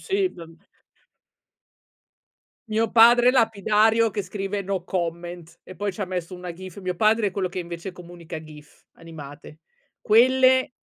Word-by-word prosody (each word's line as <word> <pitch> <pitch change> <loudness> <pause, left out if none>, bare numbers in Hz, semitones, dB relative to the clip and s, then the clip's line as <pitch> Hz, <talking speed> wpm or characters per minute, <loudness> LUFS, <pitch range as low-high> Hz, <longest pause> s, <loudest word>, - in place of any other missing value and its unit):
Sì, 385 -1 -1
m 165 -1 -11 2.1
Mio 225 +1 0
padre 240 +2 +6
lapidario 225 -1 +3
che 205 0 -3
scrive: 195 +1 -4
"No 190 -2 -3
comment" 175 -1 -5
e 185 - -12
poi 205 -1 -2
ci 180 - -10
ha 195 - -1
messo 180 -1 -5
una 180 0 -7
gif. 185 +2 -10
Mio 185 -1 -3
padre 215 +1 +3
è 200 - 0
quello 190 -1 -2
che 180 - -7
invece 170 +1 -6
comunica 170 -2 -10
gif, 150 -1 -16
animate. 155 -2 -12 0.4
Quelle, 260 +3 +4
190 Hz, 145 wpm, -24 LUFS, 170-225 Hz, 2.1 s, padre